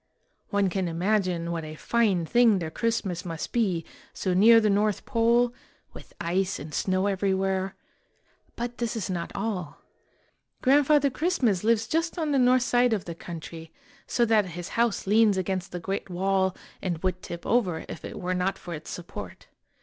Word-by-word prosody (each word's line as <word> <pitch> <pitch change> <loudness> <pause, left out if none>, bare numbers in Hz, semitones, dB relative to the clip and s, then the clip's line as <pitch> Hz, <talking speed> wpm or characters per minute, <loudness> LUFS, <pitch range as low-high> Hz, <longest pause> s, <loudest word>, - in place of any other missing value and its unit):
One 200 -1 +2
can 185 0 -1
imagine 175 -1 0
what 165 -1 -3
a 155 0 -7
fine 200 -2 +1
thing 235 +2 +4
their 165 -3 -4
Christmas 200 -5 -1
must 165 -2 -5
be, 190 -9 0 0.3
so 185 - -1
near 225 +5 +7
the 215 - +2
North 205 0 +1
Pole, 235 0 +2 0.4
with - - -13
ice 185 +3 0
and 150 +1 -9
snow 185 +3 0
every 195 -1 +1
where; 190 0 -1 0.8
but 240 0 -5
this 235 -1 -1
is 205 -4 -3
not 170 -2 -3
all. 195 -6 -3 0.9
Grandfather 285 +1 +4
Christmas 255 - +1
lives 225 0 +2
just 330 +2 -1
on 315 -3 -1
the 275 - +3
north 250 0 +4
side 245 -1 +3
of 205 -4 -2
the 170 - -5
country, 165 -1 -9 0.4
so 240 - +2
that 220 -2 +3
his 175 0 -5
house 235 -2 0
leans 210 0 +4
against 185 0 -2
the 175 - -4
great 195 +3 -4
wall 190 +1 +1 0.3
and 175 -3 -2
would 185 -1 -1
tip 170 0 -8
over 190 -9 +1
if - - -8
it - - -7
were 180 +1 -2
not 185 +2 0
for 175 - -8
its 155 0 -8
support. 100 - -8
195 Hz, 175 wpm, -26 LUFS, 180-230 Hz, 0.9 s, near